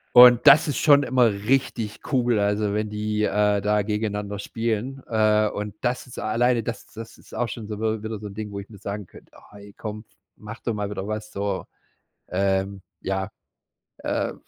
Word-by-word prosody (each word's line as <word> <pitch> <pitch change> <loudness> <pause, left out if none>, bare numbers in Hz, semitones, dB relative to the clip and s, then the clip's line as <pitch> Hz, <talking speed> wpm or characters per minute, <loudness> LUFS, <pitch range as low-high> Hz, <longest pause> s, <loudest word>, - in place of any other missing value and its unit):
Und 125 +1 +9
das 150 +3 +8
ist 145 - -1
schon 145 -2 +5
immer 125 -3 +4
richtig 110 0 -1
cool, 120 -4 +3
also, 105 0 +1
wenn 105 0 -1
die, 105 0 -1
äh, 105 -1 +2
da 105 +1 +2
gegeneinander 105 -1 -2
spielen, 115 +5 -3
äh. 110 -1 +3
Und 105 -1 -5
das 125 +1 -1
ist, 125 - -11
alleine, 120 +2 +1
das 115 +1 -4
ist - - -21
das 115 0 -8
ist - - -15
auch 120 - -1
schon 110 -1 -6
so 105 0 -6
w 110 -1 -1
wieder 110 0 -4
so 105 - -8
'n 100 - -8
Ding, 105 0 -5
wo 100 - -5
ich 100 - -11
mir 110 - -13
sagen 100 0 -5
könnte: - - -17
„Oh - - -18
hey, 100 0 -13
komm, 105 0 -6 0.3
mach 110 +2 -9
doch 115 - -2
mal 105 -1 -3
wieder 100 -1 -4
was,“ 105 0 -5
so, 100 -1 -2 0.7
ähm, 95 +1 0 0.2
ja, 95 0 -2 0.7
äh - - -2
105 Hz, 200 wpm, -24 LUFS, 105-115 Hz, 0.7 s, Und